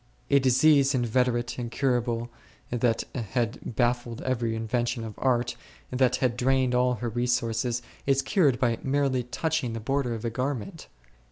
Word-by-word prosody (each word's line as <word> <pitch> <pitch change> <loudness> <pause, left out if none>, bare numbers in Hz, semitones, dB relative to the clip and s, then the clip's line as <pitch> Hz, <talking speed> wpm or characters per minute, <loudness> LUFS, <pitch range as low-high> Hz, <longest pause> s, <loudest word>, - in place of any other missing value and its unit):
A 140 - +6
disease 140 +1 +4
inveterate, 120 0 0
incurable, 120 -1 -1 0.4
that 120 -1 +1
had 120 0 -2 0.2
baffled 120 -1 0
every 120 -3 -1
invention 120 +2 -1
of 110 -1 -6
art, 125 -2 +1 0.4
that 125 -1 +2
had 125 -2 0
drained 130 0 +2
all 125 0 +2
her 120 +1 -3
resources, 120 0 0 0.2
is 135 0 +3
cured 145 - +2
by 120 -3 +1
merely 135 -2 +1
touching 140 0 -2
the 115 - -4
border 125 +1 -1
of 115 +1 -6
a 115 - -1
garment 135 - -4
125 Hz, 145 wpm, -27 LUFS, 120-130 Hz, 0.4 s, A